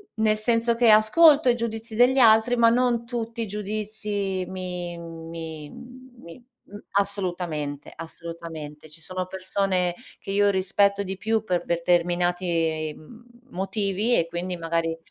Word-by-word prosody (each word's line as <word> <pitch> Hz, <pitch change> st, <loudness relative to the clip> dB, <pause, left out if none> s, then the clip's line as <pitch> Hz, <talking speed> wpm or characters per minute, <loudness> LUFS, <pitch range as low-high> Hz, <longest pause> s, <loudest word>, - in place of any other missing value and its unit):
n 220 Hz, -, -2 dB
nel 215 Hz, 0 st, +3 dB
senso 230 Hz, +1 st, +1 dB
che 235 Hz, -1 st, +4 dB
ascolto 280 Hz, +7 st, +6 dB
i 240 Hz, -, +4 dB
giudizi 225 Hz, -1 st, -4 dB
degli 250 Hz, +3 st, +4 dB
altri, 225 Hz, 0 st, +5 dB
ma 230 Hz, -1 st, +5 dB
non 240 Hz, -1 st, +1 dB
tutti 230 Hz, -1 st, -4 dB
i 225 Hz, -, -2 dB
giudizi 210 Hz, -1 st, -3 dB
mi 180 Hz, -2 st, -5 dB
mi 165 Hz, -2 st, -8 dB
mi 245 Hz, -7 st, -13 dB, 0.3 s
m 205 Hz, -, -11 dB
assolutamente, 175 Hz, -8 st, -2 dB
assolutamente. 165 Hz, -2 st, -9 dB
Ci 155 Hz, +2 st, -10 dB
sono 185 Hz, +2 st, -4 dB
persone 185 Hz, -1 st, -1 dB, 0.3 s
che -, -, -7 dB
io 205 Hz, +1 st, +3 dB
rispetto 200 Hz, +1 st, +2 dB
di 190 Hz, 0 st, -5 dB
più 220 Hz, +1 st, 0 dB
per 180 Hz, -4 st, -1 dB
determinati 170 Hz, -2 st, 0 dB
mhmm, 230 Hz, +10 st, -15 dB, 0.3 s
motivi 195 Hz, +4 st, 0 dB
e 165 Hz, -, +1 dB
quindi 175 Hz, +2 st, -4 dB
magari 165 Hz, 0 st, -1 dB
195 Hz, 140 wpm, -25 LUFS, 170-225 Hz, 0.3 s, ascolto